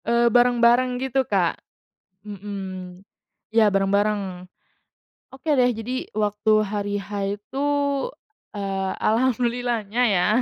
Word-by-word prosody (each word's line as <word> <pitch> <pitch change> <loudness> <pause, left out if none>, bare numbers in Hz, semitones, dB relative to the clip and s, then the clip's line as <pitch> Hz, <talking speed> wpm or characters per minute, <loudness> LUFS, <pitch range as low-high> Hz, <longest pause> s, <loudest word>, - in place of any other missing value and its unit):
Eee, 235 0 +3
bareng-bareng 245 +1 +4
gitu, 265 +1 0
Kak? 185 -5 +1 0.6
Mhm. 190 -2 -7 0.5
Ya 220 -2 +5
bareng-bareng. 195 -2 0 0.9
Oke 270 +4 -6
deh. 250 0 +4
Jadi 245 +4 -4
waktu 210 0 0
hari 205 0 -3
H 205 +1 -6 0.3
itu, 265 +6 -6 0.9
eee, 195 -1 -2
alhamdulillahnya 240 -1 0
ya 180 -4 +2
210 Hz, 100 wpm, -23 LUFS, 195-240 Hz, 0.9 s, Ya